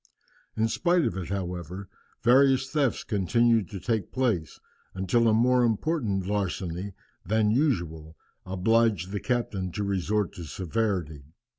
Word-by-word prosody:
In 110 +1 +2
spite 175 +7 +2
of - - -1
it, 95 -3 -5
however, 90 -1 -4 0.4
various 130 +2 +5
thefts 145 -5 0
continued 110 0 +2
to 95 - -6
take 110 0 -2
place, 110 -12 -1 0.4
until 95 +5 +2
a - - +5
more 125 +3 +4
important 115 - 0
larceny 95 -1 -3 0.3
than 110 0 +2
usual 85 - -1 0.3
obliged 95 0 +1
the 100 - -2
captain 100 -7 -2
to 105 - -2
resort 100 +1 -1
to 85 - -8
severity. 90 -5 -2
105 Hz, 130 wpm, -27 LUFS, 90-120 Hz, 0.4 s, various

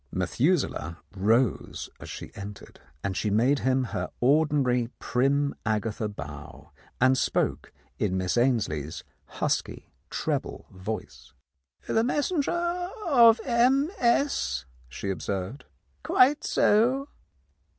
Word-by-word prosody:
Methu 120 - +2
selah 85 -9 -4 0.2
rose 110 +5 +1
as - - -9
she - - -8
entered, 100 +1 -10 0.2
and 100 -1 -2
she 105 - -1
made 125 +7 +3
him 130 0 +1
her 125 - -3
ordinary 135 -3 +3
prim 140 +3 +1
Agatha 110 0 -1
bow, 75 -7 -9 0.3
and 130 +1 +5
spoke - - -1 0.3
in 95 - 0
Miss 90 -1 0
Ainslie's 100 - 0 0.2
husky - - -3 0.2
treble - - -3
voice. 100 +4 -7 0.5
"The 225 - +1
messenger 345 +6 0 0.2
of 235 -7 +6
M. 265 +6 +3
S.," 235 - +1 0.2
she 100 +10 -4
observed. 95 - -4 0.4
"Quite 270 - +4
so." 250 +6 +3
130 Hz, 110 wpm, -27 LUFS, -, 0.5 s, of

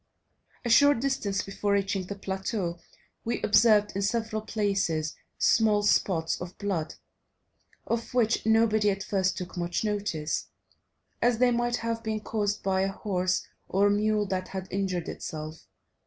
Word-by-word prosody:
A - - 0
short 285 +3 +6
distance 235 -7 -1
before 200 +1 -1
reaching 195 -2 0
the 200 - -5
plateau, 190 -2 -3 0.4
we 235 - -1
observed, 210 -2 +4
in 195 - -1
several 220 +1 -1
places, 195 -8 -1 0.2
small 215 -2 +3
spots 170 -6 +1
of 180 +1 -7
blood, 190 -6 -2 0.9
of 230 0 -2
which 230 -2 +2
nobody 220 -1 +3
at 195 -1 -2
first 190 -2 0
took 180 -1 -6
much 175 +2 -2
notice, 200 -7 -2 0.7
as 245 -1 +3
they 250 +1 +4
might 240 0 +1
have 230 -1 -2
been 220 -1 -2
caused 210 -1 -2
by 190 -1 +1
a 195 0 0
horse 185 -2 -1 0.2
or 200 +2 +3
mule 210 0 +2
that 185 -1 -2
had 190 -1 -6
injured 185 -3 -1
itself. 155 -1 -7
205 Hz, 145 wpm, -28 LUFS, 190-220 Hz, 0.9 s, short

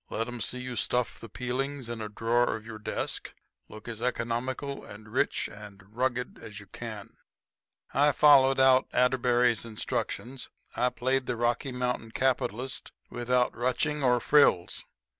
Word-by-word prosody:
Let 115 +2 -2
'em 120 -1 -6
see 125 - -2
you 125 -1 -5
stuff 125 0 0
the 115 - -10
peelings 130 +3 -3
in 120 -1 -5
a 105 - -4
drawer 115 +3 +1
of 110 -1 -9
your 110 -1 -8
desk. 105 - -4 0.3
Look 110 +1 -11
as 115 -1 -6
economical 125 +3 -2
and 105 +1 -11
rich 105 - 0
and 105 -1 -11 0.2
rugged 125 0 -1
as 105 0 -9
you 105 - -12
can." 110 0 -8 0.8
I 145 +2 +4
followed 135 -2 +6
out 130 -1 +5
Atterbury's 125 -2 +3
instructions. 115 +2 -4 0.3
I 125 - +2
played 130 +2 0
the - - -1
Rocky 120 +3 0
Mountain 125 -3 -2
capitalist 130 -1 -1 0.2
without 125 +1 +1
ruching 145 +5 0
or 125 -2 +4
frills. 115 -12 +3
125 Hz, 150 wpm, -29 LUFS, 115-130 Hz, 0.8 s, followed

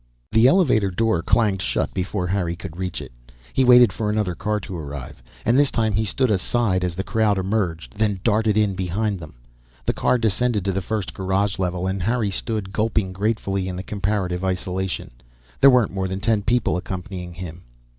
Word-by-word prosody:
The 115 +3 +6
elevator 130 - +4
door 110 -1 +1
clanged 100 0 +2
shut - - -1
before 95 0 -2
Harry 90 -2 -1
could 80 -1 -8
reach 90 -1 -4
it. - - -11 0.4
He 135 - +3
waited 125 -1 +7
for 105 -2 -2
another 105 -4 0
car 105 +4 -1
to 95 - -7
arrive, 70 -6 -7 0.2
and 120 +4 +4
this 145 -1 +4
time 110 -2 0
he 110 +2 +1
stood 125 +3 +1
aside 95 -1 +1
as 90 -2 -2
the 95 - -2
crowd 110 -2 +1
emerged, 95 -1 -2
then 105 -3 +1
darted 110 -1 +2
in 105 -2 +2
behind 95 +2 -1
them. 75 -6 -11 0.5
The - - +1
car 125 - +2
descended 110 -1 +1
to 100 - +1
the 95 +1 -1
first 105 +1 -3
garage 95 +1 -1
level, 90 -1 -1
and 95 0 -2
Harry 110 +1 0
stood 100 -1 -3
gulping 110 -3 0
gratefully 100 -1 -1
in 90 - -4
the 90 - -5
comparative 95 -2 -2
isolation. 95 0 -2 0.5
There 140 - +8
weren't 125 -6 +3
more 95 -1 -1
than 95 +1 -4
ten 110 0 +1
people 120 -2 +1
accompanying 90 -1 -6
him. 90 -1 -8
100 Hz, 190 wpm, -22 LUFS, 90-110 Hz, 0.5 s, There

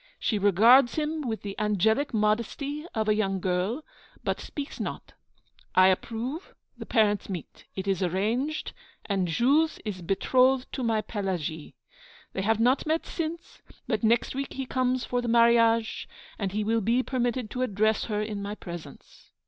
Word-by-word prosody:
She 215 - 0
regards 230 +6 +6
him 310 0 -1
with 220 -2 -3
the 200 -1 -5
angelic 215 +6 +2
modesty 235 +8 -1
of 220 -1 0
a 215 - +4
young 195 -3 0
girl, 185 - -1 0.4
but - - -1
speaks 285 -1 -6
not. - - -5 0.6
I 185 0 +7
approve, 235 - -3 0.2
the - - -9
parents 210 -3 +2
meet, 175 -6 -7
it 190 0 -4
is 195 -2 0
arranged, 220 - -1 0.3
and 195 -3 0
Jules 280 - +2
is 195 -4 -4
betrothed 255 +8 +2
to 265 - -3
my 225 -3 +1
Pelagie. 175 -7 -4 0.6
They 190 - -2
have 220 +2 +1
not 250 +6 +2
met 320 +1 0
since; 335 0 -5 0.3
but 220 -4 -1
next 230 +2 +2
week 275 +1 -4
he 270 - -4
comes 255 0 0
for 245 0 -1
the 240 - -4
marriage, 230 -1 +3 0.3
and 195 -3 -1
he 210 +2 -1
will 225 +2 +1
be 235 +5 +2
permitted 245 -3 -1
to 250 - -3
address 215 -2 +1
her 210 -1 -1
in 210 -2 -4
my 205 +1 -4
presence. 170 -7 -11
225 Hz, 165 wpm, -27 LUFS, 200-255 Hz, 0.6 s, I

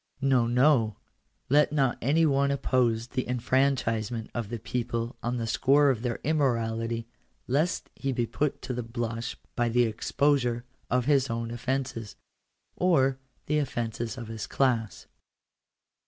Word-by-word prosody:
No, 130 -4 +3
no; 120 -3 +3 0.5
let 145 +2 +4
not 135 -5 +1
any 155 +6 +3
one 140 -1 +2
oppose 125 -4 +1
the 130 -1 -2
enfranchisement 120 -3 0
of 115 -4 -3
the 120 - -3
people 115 +1 -3
on 120 +1 -2
the 115 - -2
score 140 +5 +4
of 115 -4 -3
their 120 -2 -2
immorality, 115 -6 0 0.4
lest 150 +7 0
he 135 - -2
be 120 -2 0
put 145 +5 -2
to 130 - -3
the 125 - -2
blush 115 0 -4 0.2
by 120 0 +1
the 120 +1 +3
exposure 120 +1 +1 0.2
of 125 0 +1
his 140 -2 +3
own 115 0 -3
offences, 120 -2 -3 0.6
or 135 -7 +2 0.3
the 150 +1 +1
offences 120 -4 -3
of 120 -3 -6
his 110 -2 -5
class. 120 -5 0
125 Hz, 140 wpm, -28 LUFS, 115-135 Hz, 0.6 s, let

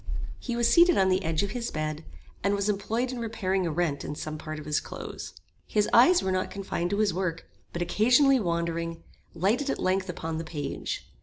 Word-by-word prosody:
He 240 - -3
was 235 -1 +3
seated 340 +7 +6
on 190 -1 +4
the 185 +1 +2
edge 160 +2 0
of 200 - -2
his 235 0 -3
bed, 155 0 -3 0.4
and 200 +1 +2
was 200 0 -1
employed 225 +5 -1
in 250 - -5
repairing 195 -5 -1
a - - -1
rent 155 -3 -1
in 150 - -5
some 155 +1 -5
part 155 0 -6
of 155 - -8
his 150 0 +1
clothes. - - -8 0.3
His 210 -1 +2
eyes 345 +10 +6
were 190 - 0
not 185 0 0
confined 190 -3 -3
to 200 - -1
his 210 -3 +2
work, 170 -2 -3 0.2
but 175 - -2
occasionally 250 - +4
wandering, 170 -3 -2 0.3
lighted 220 - +1
at - - 0
length 190 0 0
upon 165 -2 -4
the - - -3
page. 145 -4 -4
190 Hz, 210 wpm, -27 LUFS, 165-225 Hz, 0.4 s, seated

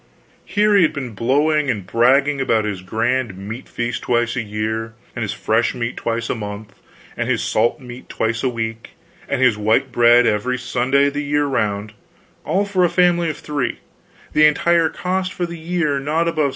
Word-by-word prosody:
Here 210 0 +2
he 200 - +6
had 155 - +3
been 135 -5 -5
blowing 145 +7 +1
and 105 -6 -2
bragging 135 +7 +3
about 115 -4 +1
his 100 -3 -3
grand 115 +2 -1
meat 105 +6 -8
feast 120 0 -3
twice 120 -1 0
a 125 - -1
year, 110 +1 -3 0.2
and 120 - -4
his 105 - -2
fresh 115 +3 0
meat 120 -1 -3
twice 115 0 -2
a - - -1
month, 105 -2 -8 0.4
and - - -2
his - - +1
salt 120 - +1
meat 125 -1 -11
twice 115 +1 -1
a 130 - +1
week, 115 -1 -5 0.4
and 140 - 0
his 115 -5 +3
white 110 +5 +1
bread 120 0 +5
every 115 +4 0
Sunday 130 +3 +1
the 145 +1 -3
year 145 0 +1
round 105 -5 -1 0.5
all 190 +6 0
for 195 -2 +1
a 175 - +4
family 175 -2 +2
of 155 - -4
three; 145 -4 -3 0.6
the 155 0 +6
entire 165 +2 +2
cost 185 0 -2
for 175 - -2
the 170 -1 -8
year 160 -4 -1
not 150 +4 -1
above 155 -3 +1
69. - - -1
125 Hz, 190 wpm, -20 LUFS, 115-150 Hz, 0.6 s, he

